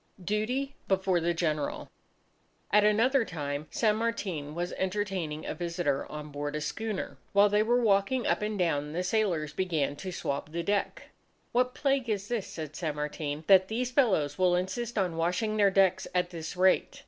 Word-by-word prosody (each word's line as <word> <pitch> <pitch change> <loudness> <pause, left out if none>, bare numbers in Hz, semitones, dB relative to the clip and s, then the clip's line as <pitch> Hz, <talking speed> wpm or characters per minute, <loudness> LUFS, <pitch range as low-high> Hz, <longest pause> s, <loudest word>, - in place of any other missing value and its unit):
Duty 245 +8 -1
Before 190 -2 +2
the 170 +1 0
General 155 -3 -2 0.8
At 210 0 +6
another 230 +5 +4
time, 150 -5 -4
San 215 -2 +1
Martin 190 -10 -3
was 175 +1 -3
entertaining 190 -5 -2
a - - -3
visitor 170 -5 -2
on 150 0 -7
board 145 +1 -4
a 150 - -2
schooner. 215 +6 -4 0.2
While 200 +1 +6
they 210 +1 +3
were 240 +3 +3
walking 210 +4 +2
up - - +1
and 210 0 -2
down, 150 -5 0
the 180 +2 -1
sailors 180 -7 0
began 160 -6 0
to 185 +3 -5
swab 145 -3 -3
the 170 0 -2
deck. 200 +3 -2 0.4
"What 245 - +4
a 250 - -17
plague 275 -4 +1
it 205 0 -2
is," 230 -5 -1
said 155 -2 -7
San 155 -4 -3
Martin, 150 0 -4
"that 190 0 +6
these 245 +4 -2
fellows 190 - +2
will 180 -1 +4
insist 220 +6 -2
on 180 -4 0
washing 180 +6 0
their 200 -1 +5
decks 190 -1 +3
at 180 0 +1
this 165 0 -6
rate." 185 +1 +3
185 Hz, 180 wpm, -29 LUFS, 155-215 Hz, 0.8 s, At